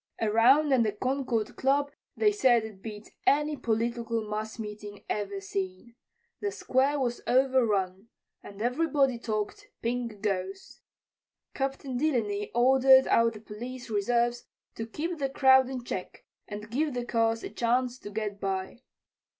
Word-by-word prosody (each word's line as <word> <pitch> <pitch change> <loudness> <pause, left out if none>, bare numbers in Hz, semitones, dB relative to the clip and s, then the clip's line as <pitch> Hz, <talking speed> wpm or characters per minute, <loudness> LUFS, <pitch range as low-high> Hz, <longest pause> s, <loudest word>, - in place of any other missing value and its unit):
Around 245 +7 +4
at 255 - +4
the 215 -3 +1
Concord 250 -1 -1
Club 280 +2 +1 0.3
they 425 -2 +4
said 255 - +3
it 210 -3 -11
beat 210 -1 -9 0.2
any 300 +1 +3
political 230 -2 -1
mass 215 +2 -4
meeting 210 -2 -8
ever 200 -1 -3
seen. 190 +3 -5 0.5
The 410 - -1
Square 275 -3 +1
was 240 -2 -1
overrun, 225 -7 +2 0.3
and 205 +1 -8
everybody 270 -1 +1
talked 215 -3 -3 0.2
"Pink 235 -2 -2
Ghost." 195 -1 -3 0.7
Captain 270 -1 -3
Delany 225 -8 0
ordered 265 +2 +6
out 230 0 +3
the 210 - -11
police 240 +3 -8
reserves 240 +3 +1 0.3
to 225 - -5
keep 330 +8 -4
the 275 -1 0
crowd 265 -1 +5
in 255 -2 -5
check 185 -6 -6 0.2
and 210 +1 -8
give 290 +2 0
the 245 -1 -2
cars 230 -1 +1
a - - -6
chance 245 +1 0
to - - -8
get 205 -1 -4
by. 195 +4 -3
235 Hz, 140 wpm, -28 LUFS, 210-265 Hz, 0.7 s, ordered